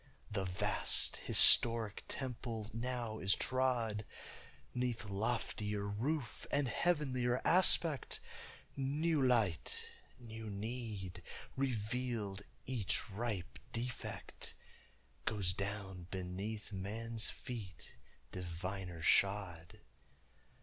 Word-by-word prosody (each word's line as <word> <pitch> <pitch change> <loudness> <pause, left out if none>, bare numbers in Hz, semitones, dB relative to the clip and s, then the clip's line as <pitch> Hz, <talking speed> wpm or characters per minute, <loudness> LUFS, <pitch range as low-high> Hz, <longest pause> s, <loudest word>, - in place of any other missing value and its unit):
The 100 -2 -1
vast 90 -1 +4
historic 115 -3 +7
temple 115 -4 -4
now 115 -1 -3
is 95 +1 +4
trod 120 -5 0 0.7
'Neath 125 -3 -2
loftier 105 0 -2
roof 120 +5 -3
and 140 -1 +1
heavenlier 130 -6 +1
aspéct; 170 -5 +4 0.6
New 150 +3 0
light, 115 -10 +2 0.3
new 115 -3 -8
need, 100 -4 -5 0.3
revealed, 115 -4 -2 0.2
each 115 -5 -2
ripe 105 -3 -4
defect 120 +1 -4 0.7
Goes 100 -5 +2
down 95 -2 -4
beneath 95 +4 -5
man's 110 +4 -2
feet 110 -8 -8 0.4
diviner 90 0 -5
shod. 95 -4 +1
110 Hz, 80 wpm, -36 LUFS, 100-125 Hz, 0.7 s, historic